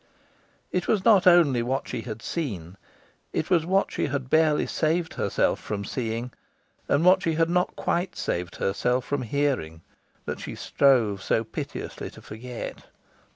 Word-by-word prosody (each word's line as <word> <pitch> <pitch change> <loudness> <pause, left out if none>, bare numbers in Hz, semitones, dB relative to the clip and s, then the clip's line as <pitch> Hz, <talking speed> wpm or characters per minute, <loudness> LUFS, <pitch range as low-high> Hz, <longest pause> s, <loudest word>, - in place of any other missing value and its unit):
It 180 0 -1
was 205 -4 +1
not 200 -5 +6
only 165 -9 +6
what 130 +3 -2
she 115 - -4
had 110 -2 -7
seen, 95 - -4 0.6
it - - -2
was 170 -2 +3
what 195 +2 +2
she - - -1
had 135 -2 -4
barely 155 -1 +4
saved 160 +1 0
herself - - 0
from 100 -1 -4
seeing, 115 +1 -3 0.6
and 145 +4 +3
what 185 +1 +6
she 165 - 0
had 165 +1 +2
not 180 +1 +1
quite 175 +2 -1
saved 85 0 -3
herself 125 +6 0
from 145 0 -1
hearing, 125 - -1 0.4
that - - -4
she - - -6
strove 115 -8 +2
so 110 - +1
piteously 110 - -6
to - - -14
forget. 120 +2 -7
135 Hz, 155 wpm, -26 LUFS, 115-170 Hz, 0.6 s, not